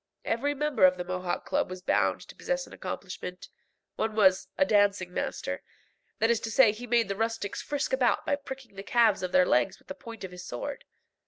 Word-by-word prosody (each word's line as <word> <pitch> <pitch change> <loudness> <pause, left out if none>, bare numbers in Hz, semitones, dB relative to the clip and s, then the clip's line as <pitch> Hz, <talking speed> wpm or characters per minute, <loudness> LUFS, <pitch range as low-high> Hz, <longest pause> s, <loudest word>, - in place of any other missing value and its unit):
Every 285 +6 0
member 295 -5 0
of 185 0 +7
the 180 - -3
Mohawk 180 0 -3
Club - - 0
was 185 0 -7
bound - - +2
to - - -12
possess - - -2
an - - -14
accomplishment. 180 0 -6 0.5
One 220 -1 -1
was 190 -3 +4
"a 285 - +4
dancing 200 -5 +2
master;" - - -3 0.6
that 225 +1 +3
is 235 - +2
to 225 - -4
say 230 -1 +6
he 235 +4 -8
made 235 -2 +3
the 195 - -2
rustics 225 -1 -2
frisk 285 -2 -2
about 255 -3 +2
by 285 - +2
pricking 265 -5 -9
the 195 - -7
calves 220 -1 +3
of 185 -1 -3
their 185 0 +5
legs 125 -6 +2
with - - -26
the - - -3
point 230 -7 -10
of 190 - -6
his 180 0 -9
sword. 120 - -6
220 Hz, 215 wpm, -28 LUFS, 185-250 Hz, 0.6 s, of